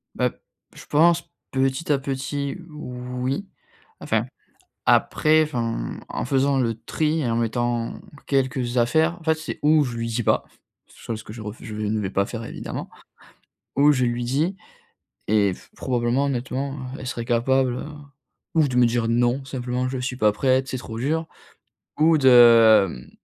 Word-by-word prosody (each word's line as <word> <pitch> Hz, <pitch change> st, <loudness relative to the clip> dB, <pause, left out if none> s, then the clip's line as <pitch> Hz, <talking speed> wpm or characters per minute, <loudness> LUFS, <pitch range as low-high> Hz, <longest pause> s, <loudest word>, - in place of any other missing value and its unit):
Bah, -, -, +1 dB
p -, -, -19 dB, 0.4 s
je -, -, -12 dB
pense 165 Hz, +3 st, +3 dB, 0.2 s
petit 135 Hz, +3 st, 0 dB
à 140 Hz, -, +3 dB
petit, 140 Hz, +1 st, -3 dB
oui. 125 Hz, +2 st, -4 dB, 0.5 s
Enfin, -, -, 0 dB, 0.6 s
après 155 Hz, 0 st, +4 dB
enfin, 120 Hz, -7 st, -3 dB
en -, -, -3 dB
faisant 135 Hz, +1 st, +2 dB
le 115 Hz, -2 st, 0 dB
tri 155 Hz, -1 st, 0 dB
en 115 Hz, -, 0 dB
mettant 120 Hz, 0 st, -1 dB, 0.3 s
quelques 130 Hz, -3 st, 0 dB
affaires, 160 Hz, +8 st, +2 dB
en 165 Hz, -, -15 dB
fait 160 Hz, 0 st, +2 dB
c'est, 160 Hz, 0 st, -6 dB
ou 150 Hz, 0 st, +4 dB
je 120 Hz, -3 st, -4 dB
lui 115 Hz, -, -2 dB
dis 115 Hz, 0 st, -2 dB
pas, -, -, +2 dB, 0.4 s
chose 110 Hz, -2 st, -7 dB
que 105 Hz, -, -10 dB
je 115 Hz, -, -9 dB
refu 105 Hz, +1 st, -8 dB
je 110 Hz, -2 st, -6 dB
ne 105 Hz, 0 st, -1 dB
vais 95 Hz, -2 st, -2 dB
pas 100 Hz, +1 st, +1 dB
faire 115 Hz, +1 st, -6 dB
évidemment, -, -, -6 dB, 0.9 s
ou 145 Hz, +2 st, +5 dB
je 125 Hz, -2 st, +1 dB
lui 120 Hz, 0 st, -1 dB
dis, 150 Hz, +10 st, 0 dB, 0.7 s
et 100 Hz, -2 st, +3 dB
f -, -, -15 dB
probablement 125 Hz, +1 st, 0 dB
honnêtement, 135 Hz, +1 st, -2 dB, 0.2 s
heu, -, -, -9 dB
elle 130 Hz, -, -7 dB
serait 120 Hz, -3 st, -4 dB
capable, 125 Hz, +1 st, +2 dB
heu, -, -, -5 dB, 0.7 s
ou 155 Hz, -2 st, +4 dB
de 130 Hz, -, -4 dB
me 125 Hz, -, +6 dB
dire: 115 Hz, -1 st, 0 dB
«Non. 120 Hz, +3 st, +1 dB
Simplement 125 Hz, -1 st, -3 dB
je 130 Hz, -, -3 dB
suis 125 Hz, 0 st, -3 dB
pas 105 Hz, -4 st, +4 dB
prête, 130 Hz, +4 st, +1 dB
c'est 130 Hz, -, -3 dB
trop 115 Hz, -2 st, -7 dB
dur» 160 Hz, +5 st, -1 dB, 0.7 s
ou 160 Hz, +1 st, +5 dB
de, 115 Hz, -5 st, +7 dB
hem, 60 Hz, -6 st, -10 dB
125 Hz, 170 wpm, -23 LUFS, 115-140 Hz, 0.9 s, de